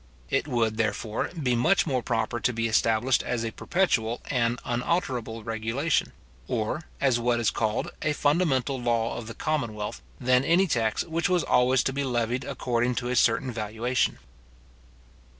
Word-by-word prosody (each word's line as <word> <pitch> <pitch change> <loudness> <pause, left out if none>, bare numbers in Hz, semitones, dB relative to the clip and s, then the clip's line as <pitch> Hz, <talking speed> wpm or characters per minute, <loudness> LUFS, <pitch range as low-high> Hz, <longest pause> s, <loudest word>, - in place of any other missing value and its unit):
It 135 - +1
would, 115 -5 0
therefore, 110 0 -1
be 125 -5 +1
much 165 +11 +3
more 130 -6 0
proper 120 0 -1
to 125 - +1
be 115 -1 -1
established 115 +3 +2
as 120 -2 -2
a 115 - -3
perpetual 120 -9 0
and 120 -2 +1
unalterable 120 -4 -1
regulation, 115 +7 -1 0.4
or 120 +7 -2
as 130 -4 +2
what 120 0 +1
is 115 - +2
called 110 0 -1
a 150 - +1
fundamental 145 -4 +1
law 115 -1 0
of 115 - -6
the 115 - -7
commonwealth, 115 -9 -2 0.2
than 125 0 +3
any 175 +6 +4
tax 115 - 0
which 165 +1 -1
was 180 -3 +2
always 125 0 +3
to 135 - -1
be 140 +1 -1
levied 120 0 -1
according 125 -3 -1
to 120 +1 -2
a 125 - 0
certain 120 +2 +3
valuation. 115 +3 -1
120 Hz, 160 wpm, -27 LUFS, 115-135 Hz, 0.4 s, any